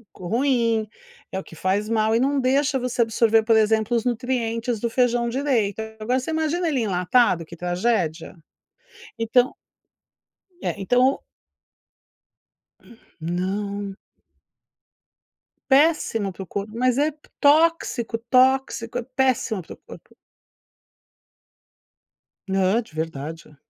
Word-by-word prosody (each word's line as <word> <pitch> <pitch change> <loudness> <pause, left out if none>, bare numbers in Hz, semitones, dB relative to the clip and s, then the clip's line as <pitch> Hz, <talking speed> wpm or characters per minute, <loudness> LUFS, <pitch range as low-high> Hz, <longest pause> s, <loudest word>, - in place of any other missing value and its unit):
ruim, 230 +2 0 0.4
é - - -3
o - - -8
que - - -15
faz 195 +5 -1
mal 220 0 +2
e - - +3
não 275 +2 +1
deixa 270 +2 +1
você 250 0 -1
absorver, 225 -1 +3
por 225 0 +4
exemplo, 220 +1 +2
os 230 - 0
nutrientes 240 -1 -1
do 235 +2 -1
feijão 240 -1 +1
direito. 235 -6 0 0.2
Agora 245 +4 0
você 260 +5 -5
imagina 320 +2 0
ele 270 -6 0
enlatado, 180 -2 +2
que 170 - -12
tragédia? 175 -2 -1 0.8
Então 245 +3 +2 1.1
É, - - -1
então 250 +7 +2 2.0
Não. 195 +4 -3 1.7
Péssimo 265 - +2
para 190 - -8
o - - -14
corpo. 200 +3 -5
Mas 250 +1 +1
é 295 +2 +2 0.3
tóxico, 290 -6 +2
tóxico. 255 0 +2
É 245 - -2
péssimo 255 -5 0
para 160 - -11
o - - -16
corpo. - - -15 2.3
Não, 190 +2 +2
é 240 - +2
de 220 - -21
verdade. 160 0 -6
230 Hz, 115 wpm, -23 LUFS, 200-255 Hz, 2.3 s, por